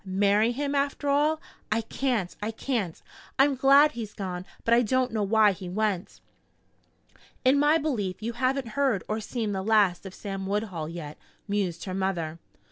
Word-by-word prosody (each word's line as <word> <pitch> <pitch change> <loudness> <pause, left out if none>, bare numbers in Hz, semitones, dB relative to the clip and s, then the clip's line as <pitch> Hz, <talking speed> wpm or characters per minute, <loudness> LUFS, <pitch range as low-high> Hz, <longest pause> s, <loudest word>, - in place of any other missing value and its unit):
Marry 200 +4 +2
him, 280 +3 -2
after 280 +1 -1
all? 300 +2 +2 0.3
I 225 +1 +2
can't 225 -5 -2
I 210 - -2
can't! 225 -6 -2 0.4
I'm 275 +1 +5
glad 275 +3 +6
he's 225 -3 -7
gone, 185 -2 -5 0.2
but 230 - +3
I 235 - +6
don't 255 +2 +1
know 220 - 0
why 210 +1 +4
he 185 -1 -7
went." 200 -1 -2 1.2
"In 265 +2 +5
my 295 +2 +5
belief 215 - -2
you 230 +2 -4
haven't 255 0 0
heard 250 -4 +1
or 215 +1 -1
seen 220 0 -3
the 190 -1 -2
last 200 -3 +2
of 190 - -10
Sam 195 -2 -5
Woodhull 195 -6 -2
yet," 160 -3 -8 0.3
mused 195 -5 -1
her 185 - -5
mother. 175 -4 -2
215 Hz, 170 wpm, -27 LUFS, 190-260 Hz, 1.2 s, glad